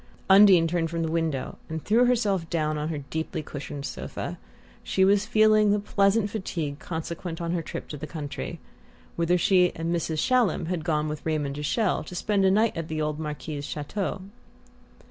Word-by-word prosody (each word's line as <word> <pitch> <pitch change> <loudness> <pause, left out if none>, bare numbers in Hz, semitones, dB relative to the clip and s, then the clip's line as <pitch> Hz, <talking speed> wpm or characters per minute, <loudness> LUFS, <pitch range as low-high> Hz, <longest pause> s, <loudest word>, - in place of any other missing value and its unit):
Undine 190 -4 +8
turned 165 -1 0
from 165 0 -2
the 160 - -2
window 160 -5 -2
and 160 -1 -5
threw 235 +4 +4
herself 205 -9 +1
down 155 -2 0
on 150 +1 -2
her 150 -3 -4
deeply 160 0 -3
cushioned 145 -1 -6
sofa. - - -5 0.4
She 190 - +2
was 200 +2 +3
feeling 215 -1 +5
the 205 - +3
pleasant 200 +1 +2
fatigue 165 -8 -4
consequent 165 +1 -5
on 170 -1 -2
her 175 -1 0
trip - - -7
to 150 - -6
the 155 - -6
country, 145 -2 -6 0.6
whither 170 +1 +2
she 180 0 +4
and 165 +1 -2
Mrs. 160 -1 -2
Shallum 250 -2 +2
had 175 -3 -2
gone 155 -2 0
with 150 0 -5
Raymond 150 -3 -1
de 145 - -5
Chelles 185 +1 0
to 180 - -8
spend 195 +2 +1
a - - +6
night 215 +4 +3
at 165 -1 -4
the 155 -1 -3
old 150 0 -1
Marquis's 150 -1 -5
chateau. 185 +7 -4
165 Hz, 185 wpm, -26 LUFS, 155-195 Hz, 0.6 s, Undine